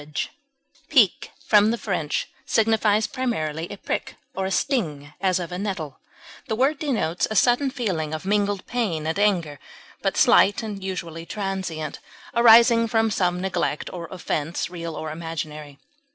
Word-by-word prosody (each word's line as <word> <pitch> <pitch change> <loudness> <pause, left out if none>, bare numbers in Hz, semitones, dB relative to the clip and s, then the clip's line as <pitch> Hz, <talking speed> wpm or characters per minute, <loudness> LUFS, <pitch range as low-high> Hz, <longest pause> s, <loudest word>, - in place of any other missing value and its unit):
grudge, 150 0 -4 0.6
Pique, 240 - +4 0.2
from 210 0 +5
the 235 - 0
French, 180 -9 -2 0.2
signifies 220 -1 +3
primarily 175 - -2
a 205 - -7
prick - - -4 0.2
or 190 0 -2
a - - -4
sting, 155 - -1
as 185 -1 +2
of 175 0 -5
a 180 - -4
nettle; 185 -9 -4 0.5
the 220 - -1
word 275 +5 +2
denotes 235 - 0
a 215 - -3
sudden 245 +5 +3
feeling 185 -12 -2
of 155 +3 -5
mingled 205 -1 0
pain 200 -11 -2
and 160 +5 -1
anger, 175 -9 +1 0.4
but - - -1
slight 205 +3 +5
and 205 -3 -6
usually 170 -4 -5
transient, 190 -6 -4 0.3
arising 235 0 +7
from 225 -1 +2
some 180 -3 +1
neglect 180 -5 -2
or 175 -2 -5
offense, 170 -2 -3
real 170 -2 -5
or 155 -1 -5
imaginary. 155 -3 -6
190 Hz, 150 wpm, -24 LUFS, 160-220 Hz, 0.6 s, arising